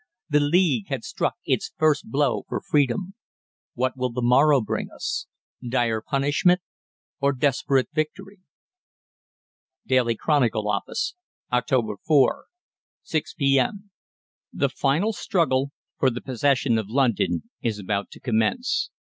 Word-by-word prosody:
The 150 -1 +4
League 145 - +2
had - - -3
struck - - -2
its - - -1
first 155 -5 +2
blow 135 +1 +1
for - - -2
Freedom. 150 +7 0 0.6
"What 130 +1 0
will 125 -1 -1
the 125 +1 -3
morrow 140 +4 +5
bring 110 - -3
us? - - -4 0.3
Dire 120 -3 0
punishment 145 +8 +2 0.6
or 140 0 +2
desperate 135 0 +1
victory?" 190 +6 -3 1.5
"'DAILY 125 -3 +2
CHRONICLE' 120 -7 +1
OFFICE, - - -2 0.4
"Oct. 120 -4 +1
4, 150 -4 +3 0.6
6 155 -2 -2
P.M. 140 +8 +1 0.6
"The - - 0
final 165 +11 +1
struggle 145 -11 +1 0.3
for 130 - +4
the 120 -1 -4
possession 130 -2 +1
of 105 -2 -5
London 110 - 0
is 115 -3 -1
about 100 0 -2
to - - -13
commence. 125 - 0
135 Hz, 120 wpm, -24 LUFS, 120-150 Hz, 1.5 s, morrow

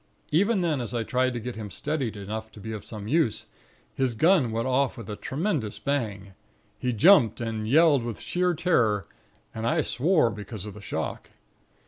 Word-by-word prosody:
Even 200 +6 +3
then 155 -6 0
as 120 0 -5
I 115 - 0
tried 130 +2 +1
to 120 - -3
get 120 +2 -6
him 105 -2 -6
steadied 135 -4 -3
enough 110 +2 -6
to - - -12
be 110 +2 -6
of 110 -2 -6
some 105 -2 -8
use, 145 -4 +1 0.5
his 130 -3 0
gun 160 - +4
went 115 +2 -1
off 130 +1 +1
with 115 - -8
a - - -4
tremendous 140 - -2
bang. 105 -9 -3 0.5
He 125 - 0
jumped, 125 - +5
and 110 -2 -3
yelled 150 +1 +5
with 115 -2 -5
sheer 180 0 0
terror; 115 - +2 0.5
and 110 +1 -3
I 160 +3 +2
swore 140 -1 +2
because 105 0 -7
of 105 - -7
the 105 - -11
shock. - - -4
120 Hz, 185 wpm, -26 LUFS, 110-155 Hz, 0.5 s, jumped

